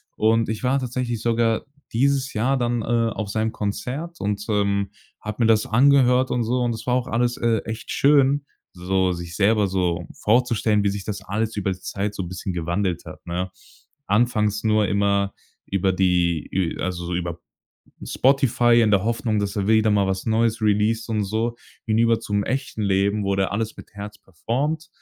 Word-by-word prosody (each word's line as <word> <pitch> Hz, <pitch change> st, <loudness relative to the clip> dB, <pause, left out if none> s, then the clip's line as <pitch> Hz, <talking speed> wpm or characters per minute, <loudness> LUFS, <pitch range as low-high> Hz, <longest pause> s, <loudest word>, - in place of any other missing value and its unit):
Und 110 Hz, +1 st, +2 dB
ich 110 Hz, +1 st, -4 dB
war 130 Hz, +2 st, +2 dB
tatsächlich 125 Hz, -3 st, -3 dB
sogar 115 Hz, -1 st, +1 dB, 0.3 s
dieses 135 Hz, +3 st, +1 dB
Jahr 125 Hz, +6 st, +1 dB
dann, 120 Hz, -1 st, 0 dB
äh, -, -, -5 dB, 0.3 s
auf 110 Hz, -, -4 dB
seinem 110 Hz, +1 st, -1 dB
Konzert 130 Hz, +12 st, -4 dB
und, 100 Hz, 0 st, -2 dB
ähm, 100 Hz, -2 st, 0 dB, 0.3 s
habe 105 Hz, +3 st, -3 dB
mir -, -, +4 dB
das 110 Hz, -1 st, +3 dB
angehört 130 Hz, +1 st, +4 dB
und 120 Hz, -1 st, +1 dB
so. 125 Hz, +2 st, 0 dB
Und 120 Hz, -1 st, 0 dB
es 110 Hz, -, -9 dB
war 125 Hz, -, +2 dB
auch 125 Hz, -1 st, 0 dB
alles, 120 Hz, +1 st, 0 dB
äh, 115 Hz, -1 st, +2 dB
echt 110 Hz, 0 st, -6 dB
schön, 140 Hz, 0 st, +3 dB, 0.3 s
so 95 Hz, +1 st, 0 dB
sich 85 Hz, -1 st, -7 dB
selber 105 Hz, +1 st, +3 dB
so 90 Hz, -3 st, -1 dB, 0.2 s
vorzustellen, 110 Hz, -2 st, +2 dB
wie 100 Hz, -, +2 dB
sich 100 Hz, 0 st, -4 dB
das 100 Hz, -1 st, -5 dB
alles 110 Hz, +3 st, -2 dB
über 95 Hz, -1 st, 0 dB
die 95 Hz, -, -6 dB
Zeit 100 Hz, +2 st, -3 dB
so 100 Hz, -, -4 dB
'n 90 Hz, -, -5 dB
bisschen 95 Hz, +1 st, -5 dB
gewandelt 85 Hz, +1 st, -1 dB
hat, -, -, -11 dB
ne? 90 Hz, +2 st, -3 dB, 0.6 s
Anfangs 105 Hz, -1 st, +1 dB
nur 110 Hz, -2 st, +3 dB
immer 100 Hz, 0 st, +1 dB, 0.3 s
über 95 Hz, 0 st, +1 dB
die 90 Hz, -3 st, +1 dB
ü 95 Hz, -3 st, -1 dB
also 90 Hz, -1 st, -3 dB
so 90 Hz, -, -2 dB
über 85 Hz, -1 st, -3 dB, 0.7 s
Spotify, 120 Hz, -3 st, +3 dB
in 110 Hz, -, +3 dB
der 100 Hz, -1 st, +3 dB
Hoffnung, 115 Hz, -1 st, 0 dB
dass 100 Hz, -1 st, -2 dB
er 100 Hz, +1 st, -1 dB
wieder 110 Hz, -1 st, +4 dB
mal 100 Hz, -2 st, +2 dB
was 95 Hz, 0 st, -2 dB
Neues 115 Hz, 0 st, +1 dB
released 110 Hz, +2 st, +1 dB
und 105 Hz, -2 st, 0 dB
so. 110 Hz, +4 st, -1 dB, 0.3 s
Hinüber 115 Hz, +1 st, +3 dB
zum 100 Hz, 0 st, -1 dB
echten 130 Hz, -4 st, -3 dB
Leben 100 Hz, +1 st, +1 dB
wo 100 Hz, 0 st, 0 dB
der 95 Hz, 0 st, 0 dB
alles 110 Hz, +1 st, -2 dB
mit -, -, -13 dB
Herz 105 Hz, 0 st, -8 dB
performed, 145 Hz, -, -3 dB
110 Hz, 185 wpm, -23 LUFS, 100-120 Hz, 0.7 s, mir